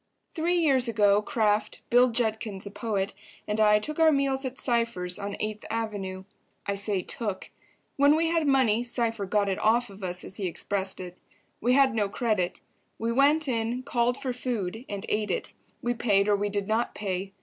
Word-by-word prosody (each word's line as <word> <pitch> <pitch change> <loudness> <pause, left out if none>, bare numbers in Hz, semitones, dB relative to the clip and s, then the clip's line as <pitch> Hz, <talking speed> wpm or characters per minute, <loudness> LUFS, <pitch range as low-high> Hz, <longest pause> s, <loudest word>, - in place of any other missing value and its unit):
Three 335 +2 0
years 275 -7 +3
ago 205 -2 +3
Kraft, 210 -1 0
Bill 245 +1 +6
Judkins 220 -4 -2
(a 200 - -7
poet), 205 -2 -2 0.3
and 210 +1 -1
I 210 -1 +6
took 305 +9 -4
our 320 -1 +6
meals 275 -1 +1
at 260 0 -4
Cypher's, 230 -7 +1
on 200 0 -4
Eighth 215 0 -3
Avenue. 205 -4 -3 0.4
I 200 - -1
say 200 -2 -1
"took." 205 -3 -4 0.5
When 285 +2 +5
we 325 +1 +2
had 330 -2 +1
money, 245 -5 +3
Cypher 230 -4 0
got 205 +1 +1
it 195 - -1
"off 235 +1 +2
of" 195 0 -12
us, 180 0 -3
as 190 - -8
he 195 - -2
expressed 190 +2 -3
it. 180 -1 -8 0.4
We 245 +3 +2
had 270 -2 +5
no 210 -3 0
credit; 210 -5 -1 0.4
we 230 +1 -1
went 285 +5 +3
in, 235 0 -1
called 245 -1 +1
for 260 -2 -3
food 230 -3 -4
and 200 -1 -4
ate 210 0 -1
it. - - -3 0.3
We 240 - +1
paid 205 -4 +2
or 205 - +4
we 205 +1 -1
did 200 -1 -2
not 225 +2 0
pay. 195 -1 -3
220 Hz, 190 wpm, -27 LUFS, 200-245 Hz, 0.5 s, Bill